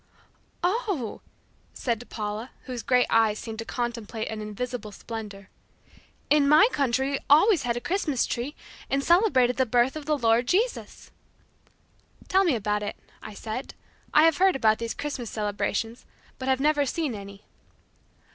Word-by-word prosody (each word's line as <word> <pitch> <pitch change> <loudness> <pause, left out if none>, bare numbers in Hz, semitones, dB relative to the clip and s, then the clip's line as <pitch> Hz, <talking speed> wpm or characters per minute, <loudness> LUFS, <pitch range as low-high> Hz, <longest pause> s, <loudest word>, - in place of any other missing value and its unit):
"Oh," 365 - -1 0.5
said 240 -1 -3
Paula 215 +3 -4
whose 250 -3 -5
great 250 0 +3
eyes 220 -2 +3
seemed 220 0 -7
to 225 - -4
contemplate 230 -2 -4
an 220 -1 -5
invisible 215 +1 -5
splendor. 205 -2 -8 0.8
"In 290 -1 +5
my 305 +8 +7
country 265 0 0
we 275 - -1
always 325 +5 +6
had 240 -1 -1
a - - -4
Christmas 320 -8 0
tree, 255 +5 -4 0.3
and 275 +1 0
celebrated 305 - +3
the 260 - +3
birth 245 +4 +2
of 305 -1 -7
the 305 -1 +2
Lord 235 -1 +2
Jesus." 435 - -1 1.2
"Tell 380 +1 +4
me 335 -8 +2
about 210 -1 -1
it," 205 - -4 0.3
I 215 - -9
said, 225 +6 -6 0.4
"I 305 - +6
have 325 -2 +4
heard 380 0 +4
about 220 -4 +3
these 230 0 -3
Christmas 265 -6 -4
celebrations, 215 +2 -2 0.4
but 260 - -5
have 265 0 +2
never 295 +1 +3
seen 305 -2 -2
any." 200 -1 -9
245 Hz, 155 wpm, -26 LUFS, 220-295 Hz, 1.2 s, my